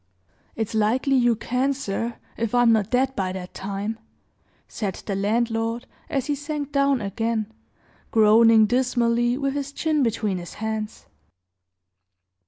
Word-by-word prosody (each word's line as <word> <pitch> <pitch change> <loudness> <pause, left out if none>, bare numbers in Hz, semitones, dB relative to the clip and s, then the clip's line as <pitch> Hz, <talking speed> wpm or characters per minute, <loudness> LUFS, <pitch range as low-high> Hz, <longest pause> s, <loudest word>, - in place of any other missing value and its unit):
"It's 220 -1 -3
likely 230 +6 +2
you 240 -2 +4
can, 255 +5 0
sir, 230 -2 -3 0.2
if 230 +1 -2
I'm 245 -1 +5
not 215 -3 +2
dead 260 +1 +1
by 190 -5 -1
that 185 -1 -7
time," 200 +3 -4 0.7
said 200 -4 -4
the 200 - -5
landlord, 225 +3 0 0.2
as 270 -3 -1
he 295 - 0
sank 290 0 -4
down 275 -3 +2
again, 220 +2 -2 0.6
groaning 220 0 +6
dismally, 240 0 +1
with 275 -1 -1
his 285 -1 -3
chin 310 0 0
between 215 -6 0
his 175 - -9
hands. 220 0 -4
230 Hz, 135 wpm, -24 LUFS, 215-260 Hz, 0.7 s, groaning